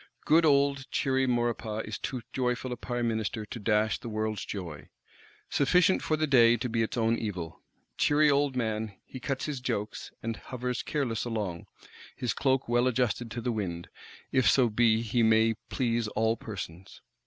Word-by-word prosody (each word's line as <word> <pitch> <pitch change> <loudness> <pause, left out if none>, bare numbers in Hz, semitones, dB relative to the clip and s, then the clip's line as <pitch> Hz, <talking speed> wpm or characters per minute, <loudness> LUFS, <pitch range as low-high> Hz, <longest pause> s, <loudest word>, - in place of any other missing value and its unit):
Good 160 +2 +5
old 140 -1 +2
cheery 130 -1 +1
Maurepas 120 -3 -1
is 110 - -5
too 125 -3 -4
joyful 125 0 -1
a - - -2
Prime 120 0 -2
Minister 110 -1 -2
to 115 - -7
dash 105 0 +1
the 120 - -7
world's 110 -1 -2
joy. 85 -7 -7 0.6
Sufficient 180 +6 +3
for 155 - 0
the 155 - +1
day 120 -5 +6
be 115 0 -1
its 115 - -2
own 115 0 +2
evil. 90 -7 -5 0.4
Cheery 150 +1 +4
old 140 -1 +2
man, 110 -3 -2
he 130 - -9
cuts 135 +1 -3
his 145 -4 -3
jokes, 110 -5 -3
and 115 -1 -3
hovers 125 +2 -4
careless 130 -7 -2
along; 105 -8 -3 0.5
his 120 -3 -1
cloak 135 -1 +1
well 120 +1 +3
adjusted 120 -2 0
to 120 +1 -5
the 120 - -1
wind, 90 -6 -4 0.4
if 130 -7 +4
so 125 +3 +4
be 115 0 +3
he 115 +1 +1
may 110 0 +4 0.2
please 120 -3 0
all 110 +1 +1
persons. 95 -5 -8
115 Hz, 170 wpm, -29 LUFS, 110-130 Hz, 0.6 s, day